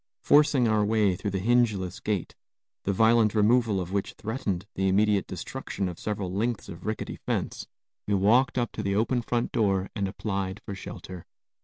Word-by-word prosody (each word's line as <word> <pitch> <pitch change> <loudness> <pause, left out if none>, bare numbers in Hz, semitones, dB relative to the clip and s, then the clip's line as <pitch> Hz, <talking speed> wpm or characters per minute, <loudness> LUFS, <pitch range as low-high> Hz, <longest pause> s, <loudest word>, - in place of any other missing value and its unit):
Forcing 145 -4 +5
our 110 -1 +3
way 105 -3 +2
through 100 - -3
the 95 -1 -2
hingeless 110 -7 +2
gate, 105 -5 -2 0.5
the 100 - +2
violent 110 +1 +4
removal 110 -1 +3
of 90 0 -5
which 100 0 -2
threatened 105 -5 -3
the 95 0 0
immediate 100 +1 +2
destruction 95 -1 -4
of 90 -2 -6
several 100 -4 -3
lengths 115 +3 -1
of 85 +4 -9
rickety 110 - -3
fence, - - -3 0.4
we 100 - +2
walked 115 +8 +3
up 120 -1 0
to - - -5
the 100 0 -1
open 120 +4 +1
front 120 0 -1
door 100 -5 +1
and 100 -3 -1
applied 95 -1 -3
for 100 - -5
shelter. 95 -2 -9
105 Hz, 175 wpm, -27 LUFS, 95-115 Hz, 0.5 s, Forcing